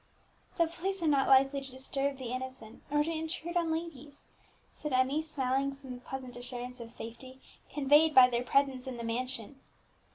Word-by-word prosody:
"The 335 Hz, -, +5 dB
police 360 Hz, +3 st, -3 dB
are -, -, +2 dB
not 280 Hz, -3 st, +3 dB
likely 270 Hz, +1 st, +5 dB
to 270 Hz, -, -8 dB
disturb 270 Hz, +1 st, -2 dB
the 250 Hz, -2 st, -5 dB
innocent, 255 Hz, -3 st, -7 dB
nor 295 Hz, +1 st, +3 dB
to 325 Hz, -, -2 dB
intrude 320 Hz, +2 st, -4 dB
on 335 Hz, -2 st, +2 dB
ladies," 300 Hz, -4 st, -5 dB, 0.5 s
said 300 Hz, -3 st, -5 dB
Emmie, 260 Hz, +4 st, +3 dB
smiling 275 Hz, -2 st, -1 dB
from 270 Hz, -2 st, -9 dB
the 245 Hz, -, -9 dB
pleasant 255 Hz, -1 st, -7 dB
assurance 245 Hz, +1 st, -6 dB
of 230 Hz, -1 st, -8 dB
safety 235 Hz, +3 st, -9 dB, 0.3 s
conveyed 295 Hz, +2 st, +4 dB
by 255 Hz, -1 st, +10 dB
their 240 Hz, -1 st, 0 dB
presence 270 Hz, 0 st, +1 dB
in 255 Hz, -2 st, -5 dB
the 235 Hz, -, -5 dB
mansion. 250 Hz, +2 st, -3 dB
270 Hz, 175 wpm, -31 LUFS, 255-295 Hz, 0.5 s, by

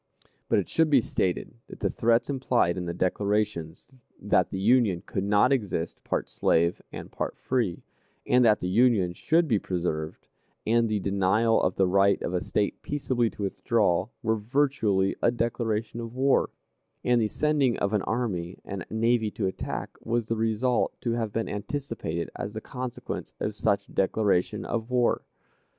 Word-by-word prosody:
But -, -, +3 dB
it 100 Hz, -, 0 dB
should 160 Hz, -1 st, +2 dB
be 140 Hz, -3 st, +6 dB
stated 95 Hz, -5 st, -1 dB
that -, -, -11 dB
the -, -, 0 dB
threats 115 Hz, +1 st, +2 dB
implied 125 Hz, -9 st, +1 dB
in 90 Hz, -1 st, -4 dB
the -, -, -1 dB
declarations 100 Hz, -, -1 dB, 0.3 s
that -, -, +2 dB
the -, -, -4 dB
Union 100 Hz, -3 st, +3 dB
could 95 Hz, -, -3 dB
not 105 Hz, +6 st, +4 dB
exist 100 Hz, -9 st, -2 dB
part -, -, -2 dB
slave 85 Hz, +1 st, +1 dB
and -, -, -8 dB
part -, -, -4 dB
free, 115 Hz, -9 st, -1 dB, 0.4 s
and 125 Hz, 0 st, +4 dB
that 110 Hz, -2 st, +4 dB
the 90 Hz, -, -1 dB
Union 100 Hz, -3 st, +3 dB
should 165 Hz, -, +2 dB
be 110 Hz, -7 st, +2 dB
preserved, 80 Hz, -5 st, -3 dB, 0.4 s
and 115 Hz, +1 st, +3 dB
the 105 Hz, -1 st, 0 dB
denial 100 Hz, +4 st, +2 dB
of 90 Hz, -, +1 dB
the 95 Hz, -, +3 dB
right 100 Hz, +2 st, +3 dB
of 85 Hz, -, -2 dB
a 90 Hz, -, -1 dB
State 105 Hz, -1 st, -1 dB
peaceably 130 Hz, -5 st, 0 dB
to 105 Hz, -, -7 dB
withdraw, 100 Hz, -2 st, +1 dB, 0.2 s
were 110 Hz, -1 st, +1 dB
virtually 110 Hz, -5 st, +1 dB
a -, -, +4 dB
declaration 115 Hz, -1 st, -2 dB
of 115 Hz, 0 st, -7 dB
war, 135 Hz, +1 st, +3 dB, 0.5 s
and 120 Hz, -1 st, +3 dB
the 110 Hz, -, +2 dB
sending 145 Hz, -1 st, +1 dB
of 100 Hz, +1 st, -1 dB
an 105 Hz, -, +2 dB
army 95 Hz, -7 st, -2 dB
and 95 Hz, -2 st, -6 dB
navy 115 Hz, 0 st, +1 dB
to 105 Hz, -1 st, -3 dB
attack 95 Hz, -, -4 dB
was 115 Hz, 0 st, 0 dB
the 115 Hz, -, -1 dB
result 115 Hz, +3 st, 0 dB
to 120 Hz, -, -1 dB
have 115 Hz, -2 st, -1 dB
been 115 Hz, +2 st, -2 dB
anticipated 105 Hz, -, -4 dB
as 105 Hz, -, -5 dB
the 110 Hz, -, -4 dB
consequence 125 Hz, -, -6 dB
of 105 Hz, -, -2 dB
such 105 Hz, -1 st, 0 dB
declaration 100 Hz, 0 st, +1 dB
of 115 Hz, 0 st, -3 dB
war. 125 Hz, -1 st, +2 dB
110 Hz, 170 wpm, -27 LUFS, 95-120 Hz, 0.5 s, be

